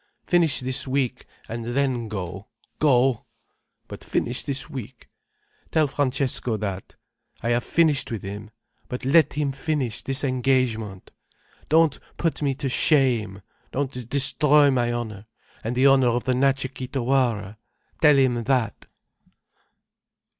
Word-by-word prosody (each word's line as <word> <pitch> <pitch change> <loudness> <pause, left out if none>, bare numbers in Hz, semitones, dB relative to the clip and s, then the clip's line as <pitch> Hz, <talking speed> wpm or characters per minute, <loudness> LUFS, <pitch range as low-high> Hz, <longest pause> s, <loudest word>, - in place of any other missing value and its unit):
Finish 170 -6 +2
this 130 +1 -3
week 130 -2 -1 0.2
and 115 +1 -5
then 120 -1 -1
go, 95 -1 -6 0.3
go—But 125 -4 -1
finish 120 +2 -1
this 135 -1 -4
week. 130 -1 -9 0.6
Tell 155 -1 +3
Francesco 130 -4 -1
that. 100 -2 -5 0.5
I 115 - 0
have 120 0 +1
finished 155 -5 +2
with 110 -4 -4
him. 105 +2 -7 0.4
But 125 +1 -6
let 155 +4 +4
him 145 -1 -1
finish 140 -4 -2
this 135 +1 -1
engagement. 125 -7 0 0.6
Don't 160 -2 +3 0.2
put 165 -2 -1
me 140 -2 0
to 140 +1 -3
shame, 125 - +2 0.3
don't 130 -3 -4
destroy 145 +1 +4
my 120 -2 +1
honour, 110 -4 -5 0.4
and 115 +3 -3
the 130 +2 +3
honour 135 -2 +5
of 120 +1 0
the 130 - +1
Natcha 135 +1 +1
Kee 130 - -6
Tawara. 120 -6 0 0.4
Tell 150 -3 +6
him 125 -3 +2
that." 125 -5 -1
130 Hz, 130 wpm, -24 LUFS, 115-140 Hz, 0.6 s, Tell